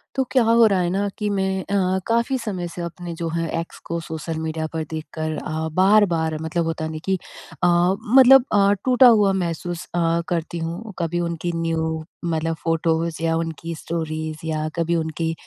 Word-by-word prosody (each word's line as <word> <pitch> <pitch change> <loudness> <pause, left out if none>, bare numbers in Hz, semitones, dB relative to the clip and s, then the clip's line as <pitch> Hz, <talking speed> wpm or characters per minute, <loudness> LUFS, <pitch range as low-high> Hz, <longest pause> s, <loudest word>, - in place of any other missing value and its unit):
तो 265 - +2
क्या 255 -3 +4
हो 230 +1 +5
रहा 195 -3 +2
है 175 -1 +1
ना 195 +3 0
कि 210 -2 -1
मैं 190 -1 -1
अ, 190 -1 0
काफ़ी 235 +3 +1
समय 185 -7 -4
से 175 - -5
अपने 170 0 -6
जो 165 0 -3
हैं, 165 0 -2
एक्स 165 - -7
को 170 - -3
सोशल 160 0 -5
मीडिया 160 0 -3
पर 160 -1 -2
देख 160 -1 -5
कर 155 -1 -3
अ, 160 +1 -3
बार-बार 185 -4 +3
मतलब 165 +1 -1
होता 160 -1 -2
है 160 - -4
ना 155 - -5
कि 190 0 +1 0.5
अ, - - +6 0.5
मतलब 265 0 +8
अ, 200 -1 +5
टूटा 255 0 +6
हुआ 210 -4 +5
महसूस 170 +1 -4
अ, 170 -1 +2
करती 170 0 -2
हूँ। 170 +7 -5
कभी 175 0 -1
उनकी 170 0 -2
न्यू 160 -1 -1 0.2
मतलब 165 -1 -1
फ़ोटोज़ 165 0 0
या 165 0 +2
उनकी 165 0 -4
स्टोरीज़ 155 -1 -4
या 155 -1 -1
कभी 170 0 0
उनकी 160 0 -1
170 Hz, 190 wpm, -22 LUFS, 160-190 Hz, 0.5 s, मतलब